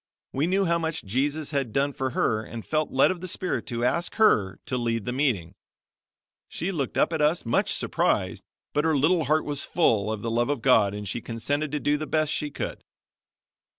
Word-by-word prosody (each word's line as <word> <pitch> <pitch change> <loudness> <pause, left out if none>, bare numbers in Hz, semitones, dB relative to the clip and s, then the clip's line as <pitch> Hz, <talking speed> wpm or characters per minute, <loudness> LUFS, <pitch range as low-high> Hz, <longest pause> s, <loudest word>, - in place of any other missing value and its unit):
We 140 +5 +1
knew 195 +2 +2
how 170 -1 +2
much 160 -1 -2
Jesus 140 +8 -1
had 135 -5 -1
done 140 +4 +1
for 130 0 -2
her 110 -3 0
and 115 0 -8
felt 155 -1 0
led 135 +6 +4
of 180 -2 -6
the 185 - -5
Spirit 180 -2 -2
to 120 -2 -1
ask 170 +8 0
her 105 - +3
to - - -2
lead 115 -3 -1
the 125 - -2
meeting. 125 - 0 0.9
She 180 +4 -3
looked 140 -8 -3
up - - +2
at 160 - 0
us 150 +1 +2
much 115 - +1
surprised - - 0 0.3
but 150 - +1
her 160 -2 +2
little 160 +3 +3
heart 155 +2 +2
was 145 -1 -2
full 110 - +2
of 110 -2 -4
the 115 - -2
love 120 +3 +1
of 140 -6 -2
God 105 -6 +4
and 105 0 -6
she 115 +4 -3
consented 140 +7 -2
to 150 - 0
do 145 +1 +1
the 155 +1 -5
best 155 -1 +1
she 150 - -2
could. - - -5
140 Hz, 215 wpm, -26 LUFS, 115-155 Hz, 0.9 s, led